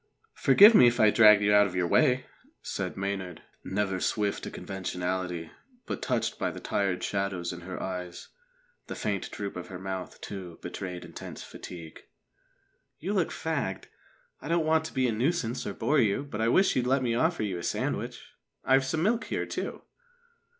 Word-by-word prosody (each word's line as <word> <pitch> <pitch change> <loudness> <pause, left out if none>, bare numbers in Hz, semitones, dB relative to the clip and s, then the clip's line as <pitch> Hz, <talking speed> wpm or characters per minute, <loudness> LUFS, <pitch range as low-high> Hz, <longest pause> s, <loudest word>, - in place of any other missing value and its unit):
"Forgive 200 - +7
me 125 - +8
if 120 +1 +1
I 110 -2 +6
dragged 105 -2 +7
you 105 0 +4
out 105 0 +6
of 90 - -7
your 90 -1 +1
way," 130 - +3 0.4
said - - -4
Maynard, 95 -3 -4 0.2
never 95 -1 -1
swift 105 +2 0
to - - -5
conventionality, 90 -2 -4 0.3
but - - -4
touched - - -1
by - - 0
the - - -7
tired 95 -3 -1
shadows 95 -3 -2
in 90 - -8
her 90 +1 -6
eyes. 90 -2 -6 0.6
The - - -5
faint 100 -2 -2
droop 100 -1 -5
of 90 - -6
her 95 - -7
mouth, 95 0 -6
too, 90 -4 -7
betrayed 90 -2 -6
intense - - -9
fatigue. 85 -3 -10 1.0
"You 190 +6 -3
look 185 -5 +1
fagged. 140 -12 -3 0.5
I - - -8
don't 165 0 +1
want 160 0 +2
to - - -7
be 130 -2 +2
a - - +1
nuisance 125 0 -1
or 100 - -3
bore 150 +1 +2
you, 110 +2 +2
but 115 -7 -5
I 115 - +2
wish 190 +11 +4
you'd 125 -1 +1
let 130 +1 +2
me 120 -2 +1
offer 160 +1 +1
you 95 -4 -2
a - - -7
sandwich. - - -2 0.4
I've 135 0 +4
some 155 +4 -1
milk 225 +5 +1
here, - - -2
too." - - -5
105 Hz, 185 wpm, -28 LUFS, 95-135 Hz, 1.0 s, me